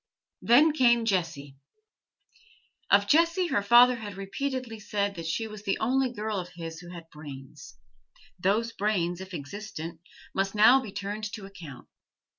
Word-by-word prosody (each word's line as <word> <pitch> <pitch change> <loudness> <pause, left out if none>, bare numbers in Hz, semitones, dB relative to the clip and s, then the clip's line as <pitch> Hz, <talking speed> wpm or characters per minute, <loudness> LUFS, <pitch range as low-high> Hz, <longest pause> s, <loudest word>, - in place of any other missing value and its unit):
Then 290 +7 +5
came 240 -5 +3
Jessie. 165 -9 -2 1.3
Of 200 0 +4
Jessie 335 - +3
her 205 - +1
father 240 +4 +6
had 205 -3 -7
repeatedly 230 +3 -4
said 205 -1 -2
that 165 -3 -6
she 225 +7 -1
was 215 -1 -9
the 195 -1 -1
only 260 +3 +1
girl 215 -3 -3
of 180 -1 -6
his 165 -1 -7
who 175 0 -11
had 170 -2 -10
brains; 145 -2 -11 0.6
those 215 +6 +1
brains, 185 -5 -1
if 190 0 -9
existent, 165 +1 -7 0.3
must 195 +1 -1
now 240 +6 +6
be 220 -6 -8
turned 205 +2 -5
to 210 -3 -7
account. 175 -9 -11
200 Hz, 150 wpm, -27 LUFS, 175-230 Hz, 1.3 s, father